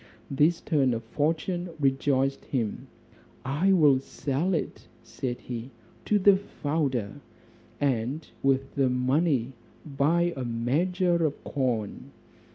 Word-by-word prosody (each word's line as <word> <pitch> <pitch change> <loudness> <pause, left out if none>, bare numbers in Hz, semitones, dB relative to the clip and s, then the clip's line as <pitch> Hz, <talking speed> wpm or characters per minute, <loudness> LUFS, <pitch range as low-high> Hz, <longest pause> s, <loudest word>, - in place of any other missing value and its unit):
This 155 +5 +3
turn 135 -6 +2
of 115 - -5
fortune 165 +8 -1
rejoiced 135 0 +1
him; 115 -6 -3 0.6
"I 150 +9 +2
will 150 -8 +5
sell 145 +6 -2
it," 155 - -4 0.2
said 125 -2 -5
he, 120 0 -6 0.4
"to 210 - +3
the 200 0 +6
founder, 145 - -2 0.6
and 135 +2 -1
with 135 0 +1
the 135 -2 +2
money 130 0 +1 0.3
buy 160 +4 +1
a 130 - -4
measure 170 +10 +1
of 150 -2 -2
corn." 120 -7 -2
140 Hz, 115 wpm, -27 LUFS, 130-165 Hz, 0.6 s, the